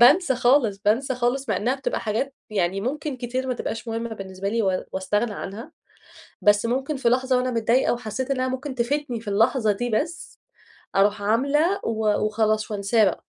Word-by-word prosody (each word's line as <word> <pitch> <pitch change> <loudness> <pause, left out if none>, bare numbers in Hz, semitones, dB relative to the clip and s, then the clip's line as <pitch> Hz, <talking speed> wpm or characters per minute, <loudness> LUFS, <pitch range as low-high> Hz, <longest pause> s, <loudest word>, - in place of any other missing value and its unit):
بانسى 280 +4 +6
خالص، 245 -5 +3
بانسى 250 +6 +2
خالص، 250 +2 -1
مع 215 - +1
إنها 240 +7 0
بتبقى 270 0 -3
حاجات 235 +6 -2 0.2
يعني 195 -1 0
ممكن 280 +3 -3
كتير 255 +1 -3
ما 255 - -1
تبقاش 230 0 -5
مهمة 230 0 -3
بالنسبة 190 -1 -5
لي 230 +2 0
و 190 -2 0
واستغنى 205 +4 0
عنها. 200 +5 -7 0.7
بس 205 +2 +4
ممكن 265 +5 -1
في 260 -3 +1
لحظة 255 +1 +2
وأنا 250 0 0
متضايقة 235 +2 +2
وحسيت 245 +3 -4
إنها 255 -1 0
ممكن 260 +2 -4
تفيدني 250 0 -1
في 220 - -10
اللحظة 220 +2 +3
دي 240 +4 -3
بس، 320 +10 -3 0.6
أروح 205 +1 +3
عاملة 280 - +2
و 220 -2 +1
وخلاص 215 0 0
وأنساه 210 +2 +2
بقى. 185 - -1
235 Hz, 175 wpm, -24 LUFS, 210-260 Hz, 0.7 s, بانسى